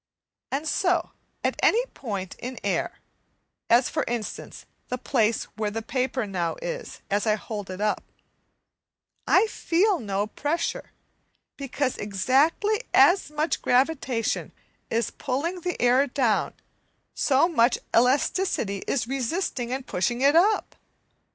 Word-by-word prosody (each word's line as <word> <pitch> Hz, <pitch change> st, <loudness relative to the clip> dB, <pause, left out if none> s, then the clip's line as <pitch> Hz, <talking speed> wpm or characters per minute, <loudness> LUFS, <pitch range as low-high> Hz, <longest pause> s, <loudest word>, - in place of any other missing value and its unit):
And 290 Hz, +4 st, -2 dB
so, 355 Hz, +3 st, +1 dB, 0.3 s
at -, -, -1 dB
any 475 Hz, +3 st, +4 dB
point 200 Hz, -7 st, -5 dB
in 255 Hz, +1 st, -6 dB
air, -, -, -1 dB, 0.7 s
as 245 Hz, +2 st, +5 dB
for 310 Hz, -, -1 dB
instance 235 Hz, -3 st, -5 dB, 0.2 s
the 250 Hz, -, -3 dB
place 230 Hz, -3 st, +1 dB
where 215 Hz, -1 st, -1 dB
the 225 Hz, +2 st, -4 dB
paper 255 Hz, +1 st, -1 dB
now 180 Hz, -4 st, -2 dB
is -, -, -6 dB
as 205 Hz, +2 st, +1 dB
I 215 Hz, -, +4 dB
hold 205 Hz, -2 st, -6 dB
it 185 Hz, 0 st, -6 dB
up, 210 Hz, 0 st, 0 dB, 1.2 s
I -, -, +5 dB
feel 385 Hz, -2 st, +1 dB
no 200 Hz, -3 st, -1 dB
pressure 295 Hz, +9 st, -3 dB, 0.6 s
because 275 Hz, -1 st, -2 dB
exactly 275 Hz, -, +2 dB
as 365 Hz, -4 st, +5 dB
much 300 Hz, +2 st, 0 dB
as -, -, -25 dB
gravitation 255 Hz, -3 st, 0 dB, 0.4 s
is 230 Hz, -1 st, 0 dB
pulling 310 Hz, +7 st, -3 dB
the 360 Hz, +1 st, -3 dB
air 250 Hz, +3 st, +4 dB
down, 245 Hz, -5 st, 0 dB, 0.6 s
so 280 Hz, +4 st, +3 dB
much 240 Hz, -8 st, +3 dB, 0.2 s
elasticity 250 Hz, -, +2 dB
is 240 Hz, -4 st, 0 dB
resisting 260 Hz, -1 st, -2 dB
and 260 Hz, 0 st, -3 dB
pushing 240 Hz, +7 st, -1 dB
it 280 Hz, +3 st, +5 dB
up. 410 Hz, +6 st, +3 dB
255 Hz, 130 wpm, -25 LUFS, 220-320 Hz, 1.2 s, as